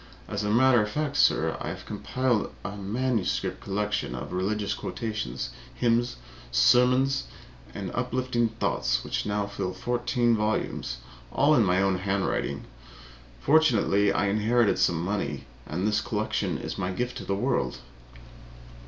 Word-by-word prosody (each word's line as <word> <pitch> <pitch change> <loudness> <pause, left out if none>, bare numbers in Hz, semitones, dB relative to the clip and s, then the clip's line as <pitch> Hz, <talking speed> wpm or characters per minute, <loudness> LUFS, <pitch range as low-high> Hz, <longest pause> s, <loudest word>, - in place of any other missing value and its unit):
As - - -3
a 105 - -1
matter 120 +2 +5
of 105 - -1
fact, 150 +3 -2
sir, - - +3
I - - -3
have - - -7
compiled 130 -4 -1 0.2
a 100 +1 -4
manuscript 110 +2 -1
collection 105 -8 -2
of - - -6
religious 100 +3 -1
quotations, 65 - -4 0.2
hymns, 120 0 +1 0.4
sermons 130 - +4 0.5
and 95 -3 -4
uplifting 125 -1 0
thoughts 65 - 0
which - - -2
now 105 0 0
fill 95 -2 -4
fourteen 120 +2 +1
volumes, 105 - -1 0.3
all 145 +3 +4
in 120 - +5
my 90 -1 +2
own 95 -1 +2
handwriting. 100 0 -1 0.8
Fortunately, 115 -10 +4
I - - +1
inherited 110 +3 +2
money, 85 -4 -2 0.2
and 90 +6 -1
this 105 -1 +2
collection - - -1
is - - -5
my 90 - -1
gift 125 +6 -3
to - - -6
the 100 - 0
world." 100 - 0
105 Hz, 135 wpm, -27 LUFS, 95-120 Hz, 0.8 s, matter